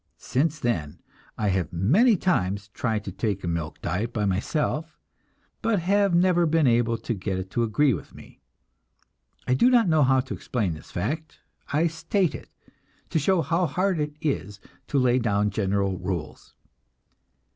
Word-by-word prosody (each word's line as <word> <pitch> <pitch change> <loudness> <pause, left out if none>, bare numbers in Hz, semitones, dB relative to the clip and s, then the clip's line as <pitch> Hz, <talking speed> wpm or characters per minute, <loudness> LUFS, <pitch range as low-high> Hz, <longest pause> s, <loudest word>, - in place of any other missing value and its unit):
Since 150 +4 -1
then, 85 -10 -2 0.4
I 105 -2 0
have 95 -4 -1
many 180 - +4
times 100 - 0
tried 110 0 -2
to 100 - -6
take 100 0 -2
a - - -3
milk 85 -2 -3
diet 105 +7 -2
by 105 -3 -1
myself, 150 - -1 0.6
but 225 -2 +1
have 195 +1 +2
never 175 -1 +4
been 160 -1 +3
able 115 -1 +2
to 120 - -3
get 95 -2 -3
it 95 0 -6
to 120 - 0
agree 120 +5 +2
with - - -7
me. - - -15 1.1
I 125 - +3
do 135 - +4
not 240 -5 +4
know 160 -2 +3
how 130 -1 +4
to 130 - -7
explain 105 -9 -2
this 80 - -11
fact; 155 - -4 0.3
I 155 +4 +2
state 165 +3 0
it, - - -9 0.6
to 160 - +2
show 175 +3 +2
how 170 +5 +1
hard 185 +4 0
it 150 0 -2
is 100 - -2 0.3
to 145 - -1
lay 125 -1 +3
down 105 -3 +1
general 100 -2 0
rules. 85 -5 -5
125 Hz, 165 wpm, -25 LUFS, 100-165 Hz, 1.1 s, many